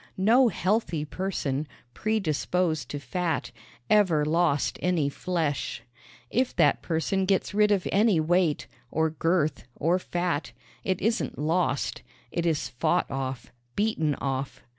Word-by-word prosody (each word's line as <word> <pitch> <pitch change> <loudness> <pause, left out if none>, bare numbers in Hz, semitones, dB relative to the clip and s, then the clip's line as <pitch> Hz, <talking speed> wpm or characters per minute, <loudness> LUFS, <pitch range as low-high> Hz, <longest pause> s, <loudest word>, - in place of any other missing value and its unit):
No 235 +7 +5
healthy 185 -8 0
person, 155 -5 -2 0.3
predisposed 180 -5 0
to 145 - -4
fat, 165 -6 -2 0.4
ever 180 -8 +4
lost 155 -2 +1
any 170 -5 +1
flesh. 160 -2 -2 0.5
If 255 +1 +1
that - - +3
person 185 +4 0
gets 195 +1 +1
rid 210 0 +4
of 195 -3 +2
any 205 -3 +4
weight, 165 -1 +2 0.2
or 160 0 +1
girth, 160 -2 0
or 170 +5 +1
fat, 175 -4 -2 0.3
it 185 -2 0
isn't 225 +2 0
lost 155 -3 0 0.3
it 170 0 -1
is 160 -3 0
fought 160 +8 0
off, 130 -3 -4 0.2
beaten 165 -9 +1
off. 135 0 -3
170 Hz, 125 wpm, -27 LUFS, 150-190 Hz, 0.5 s, No